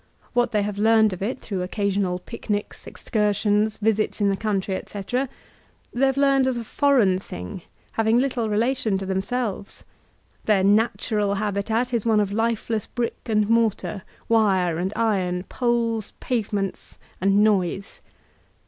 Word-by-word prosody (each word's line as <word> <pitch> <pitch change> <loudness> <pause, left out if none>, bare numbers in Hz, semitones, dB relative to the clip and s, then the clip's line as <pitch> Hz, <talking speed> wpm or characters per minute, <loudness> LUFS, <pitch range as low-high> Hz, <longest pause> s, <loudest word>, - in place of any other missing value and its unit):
What 245 -1 +2
they 210 -2 +1
have 205 0 -4
learned 220 -1 +4
of 185 - -8
it 240 +6 -3
through 195 -4 -4
occasional 195 -1 -1
picnics, 205 +1 -5
excursions, 210 0 0
visits 215 0 0
in 205 -1 +3
the 195 - +1
country, 195 -2 -1
etc., 245 +8 -3 0.6
they 270 +3 +3
have 270 0 0
learned 275 -1 +4
as 255 -2 0
a 235 - -3
foreign 225 -7 +3
thing, 90 - -8 0.3
having 225 +1 +2
little 245 -3 0
relation 220 -1 +1
to 195 - -5
themselves; 195 +2 -3 0.6
their 205 -3 +3
''natural*' 210 0 +2
habitat 215 +4 -1
is 230 -3 +1
one 220 -2 +3
of 200 -1 0
lifeless 225 -1 -1
brick 240 -2 -3
and 215 -2 +2
mortar, 225 -3 +1 0.3
wire 190 -7 +2
and 185 +2 -1
iron, 190 -6 0
poles, 230 -3 0
pavements, 205 -5 -3 0.2
and 195 +2 +4
noise. 195 -1 0
215 Hz, 140 wpm, -24 LUFS, 195-230 Hz, 0.6 s, learned